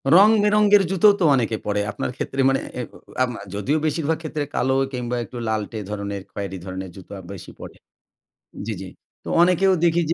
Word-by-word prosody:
রং 205 +3 +8
বেরঙের 210 -1 +5
জুতোও 195 +2 +6
তো 180 - +1
অনেকে 115 -3 0
পড়ে। 105 0 0
আপনার 125 - -3
ক্ষেত্রে 135 - -2
মানে 135 - +2 0.2
এ - - -1 0.7
যদিও 120 +10 0
বেশিরভাগ 155 +1 0
ক্ষেত্রে 155 -2 -3
কালো 130 +1 +1 0.2
কিংবা 125 -1 -2
একটু 120 - -9
লাল্টে 110 0 -2
ধরনের 100 -1 -4
খয়েরি 100 -2 -5
ধরনের 95 0 -6
জুতো 95 0 -13 0.2
বেশি 95 - -10
পড়ে - - -9 0.9
জ্বি, 110 - -2
জ্বি। 95 - -7 0.3
তো - - -7
অনেকেও 185 +2 +4
দেখি 170 0 +3
যে, - - +3
130 Hz, 170 wpm, -22 LUFS, 105-175 Hz, 0.9 s, রং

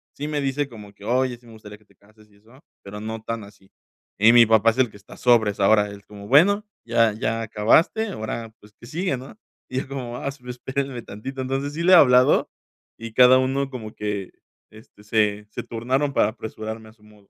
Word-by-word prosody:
Sí, 145 - -5
me 150 - -2
dice 140 +1 -2
como 105 -4 -12
que: 100 - -18
"Oye, 125 +3 0
sí, 120 - -25
me 115 - -15
gustaría 105 -2 -12
que 105 - -29
te - - -28
cases", 105 +1 -24
y 100 - -25
eso, 115 +7 -21 0.2
pero 105 +1 -9
no 110 +1 -5
tan 115 -1 -5
así. 100 -1 -17 0.5
Y 110 +3 +6
mi 120 -1 +7
papá 110 0 +4
es 115 - -2
el 130 -2 +3
que 100 - -14
está 100 - -15
sobres, 110 -5 +2
ahora 105 +1 +3
es 100 0 -13
como: 100 -1 -12
"Bueno, 200 +9 +4 0.2
ya 115 -1 +3
ya 115 0 -2
acabaste, 115 - +2
ahora, 115 - -6
pues, 105 0 -19
¿qué 115 - -13
sigue, 155 +1 -2
no?" 135 - -12 0.3
Y 130 0 -2
yo 130 - -6
como: 125 -3 -6
"Ah, - - -5
esp 130 -3 -12
espéreme 130 +1 -4
tantito". 130 +6 -7
Entonces 135 +2 -3
sí 165 - -4
le 185 - +4
he - - +10
hablado. 125 -5 +5 0.5
Y 115 -1 -9
cada 130 +2 +7
uno 135 +1 -1
como 110 -5 -8
que, 105 -2 -4 0.4
este, 110 -1 -18
se 105 -1 0
se - - -6
turnaron 130 +5 -2
para - - +3
apresurarme 110 0 -7
a 110 - -18
su 115 - -32
modo. 105 -2 -21
115 Hz, 220 wpm, -23 LUFS, 105-130 Hz, 0.5 s, he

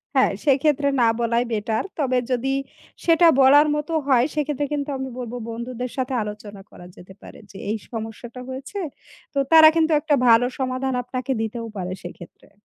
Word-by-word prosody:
হ্যাঁ, - - +4
সেক্ষেত্রে 285 +1 +2
না 230 - +5
বলাই 235 +1 +1
বেটার। 220 +1 -1 0.2
তবে 255 -3 +1
যদি 260 +2 0 0.5
সেটা 335 0 +5
বলার 290 +3 +6
মতো 300 +2 -3
হয়, 255 -2 +4
সেক্ষেত্রে 295 -1 -1
কিন্তু 290 0 -3
আমি 265 0 -5
বলব 240 -1 -6 0.2
বন্ধুদের 240 +1 -5
সাথে 260 0 -2
আলোচনা 210 -1 -8
করা 175 - -13
যেতে 185 +2 -14
পারে - - -13
যে, 195 - -12
এই 220 - -1
সমস্যাটা 230 +2 -7
হয়েছে। 270 +10 -6 0.5
তো - - -6
তারা 320 -1 +9
কিন্তু 325 0 +2
একটা 295 -1 +1
ভালো 230 +1 +6
সমাধান 260 0 -2
আপনাকে 255 +2 -4
দিতেও 230 +1 -4
পারে 185 0 -4
সেইক্ষেত্রে। 175 0 -12
255 Hz, 165 wpm, -22 LUFS, 230-285 Hz, 0.5 s, তারা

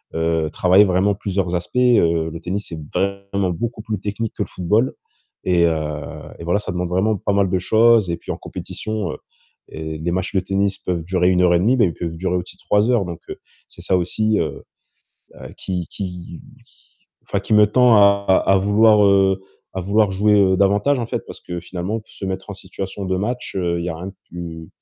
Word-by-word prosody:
heu, 80 -1 0
travailler 95 +4 +5
vraiment 95 +2 +2
plusieurs 95 -3 -2
aspects, 90 +8 -4
heu, 85 -10 +3
le 85 - -7
tennis 95 +4 -4
c'est 80 -2 -6
vraiment 100 -1 -1
beaucoup 115 +5 -4
plus 105 -3 -4
technique 105 +2 -4
que 105 - -1
le - - -8
football 105 +8 0 0.5
et 90 -2 +3
heu 80 -1 +2 0.6
et - - -8
voilà, 90 +4 +1
ça - - -5
demande 90 0 -2
vraiment 100 +4 +1
pas 100 - -2
mal 100 -2 +2
de 95 - +1
choses 110 0 +4
et 85 - -2
puis, - - -7
en - - -4
compétition, 110 -6 -5
heu - - -7 0.5
et 80 0 -5
des 85 +2 -2
matchs 95 +2 -2
de - - +4
tennis 100 +1 0
peuvent 85 -3 -3
durer 90 +1 +1
1 90 0 +3
heure 90 -1 +4
et - - +3
1/2 120 +8 +3
bah 115 - +5
ils 85 - -1
peuvent 80 -1 -5
durer 90 0 -1
aussi 90 - -7
3 105 +3 +1
heures, 115 -6 +2
donc 85 -2 -6
heu, - - -5 0.3
c'est - - -13
ça 95 - +1
aussi, 105 +4 0
heu 80 - -3 0.7
heu, - - -10
qui 90 -3 -3
qui 90 -3 -7 0.3
qui - - -22 0.4
enfin - - -2
qui 110 - -1
me 105 0 +7
tend 120 +1 +5
à 100 0 +5 0.2
à 95 0 +5
vouloir, 105 +2 +4
heu, 95 -1 +4 0.3
à 95 - -2
vouloir 100 +2 +2
jouer, 105 +2 +3
heu, 95 -1 +4
davantage, 105 +8 +3
en 115 - -3
fait. - - -4
Parce - - -10
que, 90 0 -6
finalement, 95 +5 -4
se 100 - -9
mettre 95 +1 -5
en 100 - -5
situation 95 +1 -7
de 95 - 0
match, 120 +3 -3
heu, 85 -2 0
il - - -4
y - - -1
a 80 - -5
rien 90 +3 -6
de - - -8 0.2
plus 85 -2 -7
95 Hz, 220 wpm, -20 LUFS, 90-105 Hz, 0.7 s, me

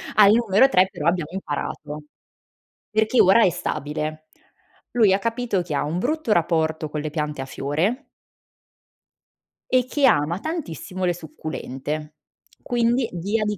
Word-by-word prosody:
Al 205 -1 +7
numero 230 +2 +4
3 185 -7 +4
però 150 - -3
abbiamo 170 -3 +1
imparato. 150 -3 -5 0.9
Perché 220 +3 +3
ora 195 +5 +6
è - - +4
stabile. 155 -2 -4 0.6
Lui 220 -5 +4
ha 190 - +3
capito 230 -3 -1
che 155 -4 -5
ha 140 - 0
un 155 +4 -2
brutto 285 - 0
rapporto 160 -3 +1
con 150 - -3
le 150 0 -4
piante 150 -2 -3
a 135 - -4
fiore 160 - -2 1.6
e 255 -1 +3
che 280 +2 +1
ama 165 - +3
tantissimo 190 - -4
le 175 - +2
succulente, 155 -2 -6 0.5
quindi 240 0 +1
via 200 +6 -1
di 210 -1 -2
180 Hz, 140 wpm, -23 LUFS, 155-225 Hz, 1.6 s, Al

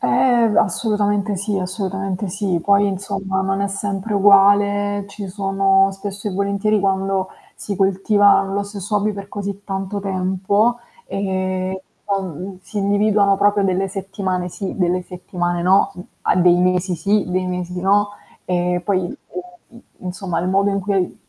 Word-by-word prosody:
Ehm, 230 - +3
assolutamente 205 0 +1
sì, 200 +2 -1
assolutamente 190 +1 -3
sì. 190 -1 -1
Poi 200 +1 +4
insomma 195 0 -2
non 195 +1 -1
è 200 - 0
sempre 200 +1 -3
uguale, 205 0 +4
ci 200 -1 -7
sono 195 0 +2
spesso 200 +1 -5
e - - -5
volentieri, 200 +2 +1
quando 195 -1 0 0.3
si 200 -2 -5
coltiva 195 +1 +4
lo 195 +1 -2
stesso 200 +1 -3
hobby 210 +1 +1
per 200 -1 -8
così 200 -1 -5
tanto 195 +1 -3
tempo, 195 +4 +1 0.3
ehm, 185 -1 -2 0.3
uhm, 190 -2 -4
si 210 - -6
individuano 200 0 +3
proprio 205 0 +3
delle 190 0 +1
settimane 190 -2 -3
sì, 190 +2 -5
delle 180 -1 +1
settimane 175 -1 -3
no, 185 +2 +4
uhm, 180 - -9 0.2
a - - +2
dei 175 -1 +5
mesi 180 0 +1
sì, 200 +5 +1
dei 185 0 0
mesi 180 0 -4
no, 205 +2 +3 0.4
ehm, 180 0 0
poi, 185 -1 0
ehm, - - -4 0.6
i 235 0 -16 0.2
insomma 185 -1 -4
il 180 - -1
modo 195 +2 +2
in 195 - -1
cui, 200 +1 -1
uhm, 180 -2 0
195 Hz, 155 wpm, -20 LUFS, 185-205 Hz, 0.6 s, dei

